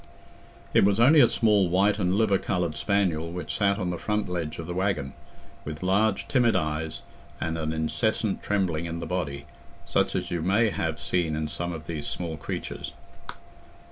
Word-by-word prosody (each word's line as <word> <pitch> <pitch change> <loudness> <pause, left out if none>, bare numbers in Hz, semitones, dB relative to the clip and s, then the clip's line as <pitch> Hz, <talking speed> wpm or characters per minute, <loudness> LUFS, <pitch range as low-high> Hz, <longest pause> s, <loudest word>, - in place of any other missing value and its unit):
It - - +5
was 100 +2 +3
only 145 +7 +7
a - - +8
small 105 -5 +3
white 100 +4 +3
and 90 -1 +1
liver 100 -3 +3
coloured 90 -5 -1
spaniel 85 -2 0
which 90 -3 -4
sat 100 -1 +2
on 90 -3 -2
the 90 - -4
front 105 0 -1
ledge 85 -3 -3
of 80 - -5
the 85 - -4
waggon, 90 -8 -1 0.5
with 75 +3 -6
large 100 +1 +2
timid 125 -6 +3
eyes, 80 -2 -2 0.4
and 80 - -2
an 80 -1 -2
incessant 95 +7 -1
trembling 90 -5 0
in 85 0 -4
the 85 - -4
body, 75 -5 -3 0.4
such - - +1
as - - -2
you 85 -2 -1
may 105 +6 +3
have 80 -4 -2
seen 80 +2 0
in 75 0 -2
some 85 +4 -4
of 80 -2 -7
these 80 -3 -4
small 85 -3 -3
creatures. - - -5
90 Hz, 180 wpm, -26 LUFS, 80-100 Hz, 0.5 s, a